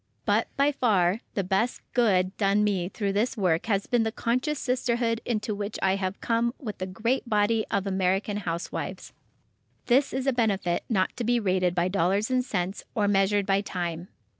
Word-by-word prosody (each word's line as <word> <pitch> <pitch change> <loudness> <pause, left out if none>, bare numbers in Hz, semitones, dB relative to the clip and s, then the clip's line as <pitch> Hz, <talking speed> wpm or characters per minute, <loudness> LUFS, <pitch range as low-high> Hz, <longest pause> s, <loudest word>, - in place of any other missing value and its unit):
But, - - +2
by 280 +1 +4
far, 205 -8 +2 0.2
the 195 - 0
best 195 +6 0
"good" 190 -6 +2
done 200 0 +2
me 190 -4 0
through 200 -1 -2
this 225 +5 0
work 175 -5 +1
has 200 -3 +1
been 245 -1 +2
the 220 0 0
conscious 255 +7 -1
sisterhood 240 -3 0
into 215 -2 -1
which 205 +1 -4
I 190 0 +3
have 190 0 -3
come 235 +1 0
with 215 -8 -7
the 185 - -3
great 230 +6 -1
body 215 +1 +2
of 200 -1 0
American 195 +2 0
housewives. 170 -4 -4 0.7
This 265 +3 +3
is 265 0 -2
a 270 - +2
benefit 200 -7 0
not 190 -5 +1
to 245 - -2
be 240 +1 +2
rated 185 -4 +1
by 175 0 +2
dollars 195 +5 +1
and 255 0 +2
cents, 195 -5 -3
or 210 -2 +2
measured 200 0 +2
by 195 0 +2
time. 175 -3 -4
205 Hz, 185 wpm, -27 LUFS, 190-235 Hz, 0.7 s, by